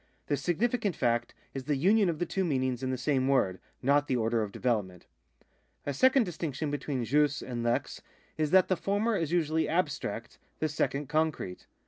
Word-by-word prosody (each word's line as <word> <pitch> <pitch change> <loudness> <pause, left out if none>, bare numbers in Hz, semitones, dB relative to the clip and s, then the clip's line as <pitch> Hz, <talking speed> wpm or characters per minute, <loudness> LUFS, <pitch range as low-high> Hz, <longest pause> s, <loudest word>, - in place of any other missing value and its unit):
The 145 - 0
significant 205 - 0
fact 120 -1 0 0.2
is 135 -1 -5
the 150 0 +1
union 195 +7 +4
of 165 - -1
the 175 - -1
two 190 - -1
meanings 130 -6 0
in 130 - -2
the 130 - -1
same 130 0 +1
word, 100 -9 +2 0.2
not 145 +2 +3
the 130 - +1
order 115 -1 +1
of 105 -2 -3
development. 100 -7 -2 0.8
A 145 - -1
second 260 - +4
distinction 155 - -3
between 140 -4 -2
jus 145 +2 +2
and 120 -2 -4
lex 120 0 -1 0.3
is 155 -1 0
that 185 +2 +5
the 185 - +2
former 205 +5 0
is 165 -4 -1
usually 160 -2 +1
abstract, 165 -3 -2 0.2
the 155 - -1
second 145 -1 -1
concrete. 155 - -1
145 Hz, 180 wpm, -30 LUFS, 130-170 Hz, 0.8 s, that